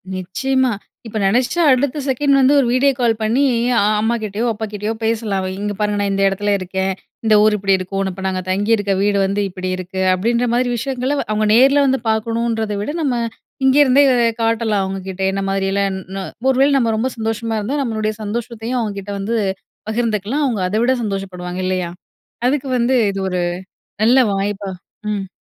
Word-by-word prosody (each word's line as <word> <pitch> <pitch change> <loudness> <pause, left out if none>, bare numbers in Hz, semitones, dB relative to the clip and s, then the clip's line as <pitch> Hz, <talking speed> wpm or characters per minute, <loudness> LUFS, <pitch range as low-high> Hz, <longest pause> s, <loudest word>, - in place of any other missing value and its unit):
நிச்சயமா. 260 +8 0 0.4
இப்ப 220 - -5
நெனச்சா 250 - +2
அடுத்த 260 +2 +1
செகண்ட் 280 +2 +2
வந்து, 270 +2 +5
ஒரு 250 - +2
வீடியோ 275 +2 +4
கால் 230 -2 +2
பண்ணி 235 +6 +2 0.3
அ - - +5 0.2
அம்மாகிட்டயோ, 220 -1 -1
அப்பாகிட்டயோ 210 0 -4
பேசலாம். 220 -3 0
"அவ 185 - -3
இங்க 205 0 -2
பாருங்க 210 -1 0
நா - - +1
இந்த 195 0 0
எடத்துல 205 +1 0
இருக்கேன். 190 +1 -2 0.3
இந்த 220 - +4
ஊரு 215 -1 +4
இப்படி 195 0 +1
இருக்கும். 195 +1 -3
நா 190 - -2
இப்ப 190 +1 -8
நாங்க 185 -1 -1
தங்கி 205 +4 0
இருக்க 205 -2 -1
வீடு 205 0 +2
வந்து 200 +1 0
இப்படியிருக்கு." 185 0 -4
அப்படீன்ற 235 +6 +1
மாரி 245 0 +1
விஷயங்கள 260 +3 -2
வ - - 0
அவுங்க 215 0 +1
நேர்ல 275 +4 +5
வந்து 265 0 +2
பாக்கணுன்றத 225 0 -1
விட, 210 - -4
நம்ம 260 -5 0 0.5
இங்கருந்தே 275 0 +5 0.4
காட்டலாம் 225 -3 +1
அவுங்ககிட்ட 190 0 -5
என்ன 195 0 -2
மாரியல்லாம் 195 0 0
ன்னொ 190 +1 -7 0.3
ஒருவேள 270 +2 +4
நம்ம 230 -3 +1
ரொம்ப 255 +4 0
சந்தோஷமா 225 0 -2
இருந்தா, 240 +8 -2
நம்மளுடைய 215 -2 -1
சந்தோஷத்தயும் 235 +3 -3
அவுங்ககிட்ட 205 -2 -4
வந்து 220 +4 -2 0.5
பகிர்ந்துக்கலாம். 225 +4 -1
அவுங்க 225 -7 -1
அத 205 - -3
விட 255 - +3
சந்தோஷப்படுவாங்க, 185 -3 -4
இல்லையா? 185 -2 -1 0.6
அதுக்கு 275 0 0
வந்து 245 +2 +2 0.2
இது 195 - -5
ஒரு 180 -1 -1 0.6
நல்ல 250 +4 +5 0.2
வாய்ப்பா 200 0 -2 0.4
ம். 195 -2 -3
215 Hz, 170 wpm, -19 LUFS, 195-245 Hz, 0.6 s, வந்து